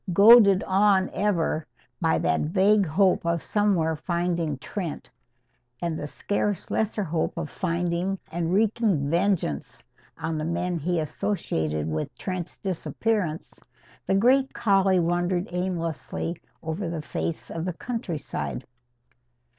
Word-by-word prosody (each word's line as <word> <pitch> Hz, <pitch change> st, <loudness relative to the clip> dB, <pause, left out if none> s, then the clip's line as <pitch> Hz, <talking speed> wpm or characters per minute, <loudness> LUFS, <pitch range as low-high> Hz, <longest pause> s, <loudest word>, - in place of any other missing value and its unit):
Goaded 200 Hz, -1 st, +8 dB
on 195 Hz, 0 st, +3 dB
ever 170 Hz, -6 st, 0 dB, 0.3 s
by -, -, +3 dB
that 80 Hz, -, +1 dB
vague 195 Hz, +4 st, +3 dB
hope 185 Hz, +4 st, +3 dB
of 170 Hz, -1 st, 0 dB
somewhere 190 Hz, -7 st, +1 dB
finding 170 Hz, -2 st, -1 dB
Trent, 170 Hz, +2 st, -5 dB, 0.7 s
and 170 Hz, 0 st, -2 dB
the 150 Hz, -, -4 dB
scarce 205 Hz, +3 st, -2 dB
lesser 220 Hz, -1 st, 0 dB
hope 165 Hz, -2 st, -2 dB
of -, -, -4 dB
finding 175 Hz, +1 st, -1 dB
and 170 Hz, 0 st, -1 dB
wreaking 200 Hz, -7 st, +2 dB
vengeance 170 Hz, -, 0 dB, 0.3 s
on 160 Hz, -1 st, -3 dB
the -, -, -2 dB
men 170 Hz, +1 st, -1 dB
he 170 Hz, +3 st, 0 dB
associated 80 Hz, -, -2 dB
with 80 Hz, -1 st, -3 dB
Trent's 185 Hz, -2 st, -4 dB
disappearance, 190 Hz, -2 st, -2 dB, 0.5 s
the 190 Hz, -, +2 dB
great 260 Hz, +6 st, +3 dB
collie 195 Hz, -3 st, +3 dB
wandered 175 Hz, +2 st, 0 dB
aimlessly 170 Hz, -2 st, -3 dB, 0.2 s
over 165 Hz, +3 st, -3 dB
the 165 Hz, -2 st, -4 dB
face 160 Hz, +1 st, -4 dB
of 165 Hz, -, -4 dB
the 180 Hz, -, -2 dB
countryside. 160 Hz, -, -4 dB
175 Hz, 125 wpm, -26 LUFS, 160-195 Hz, 0.7 s, Goaded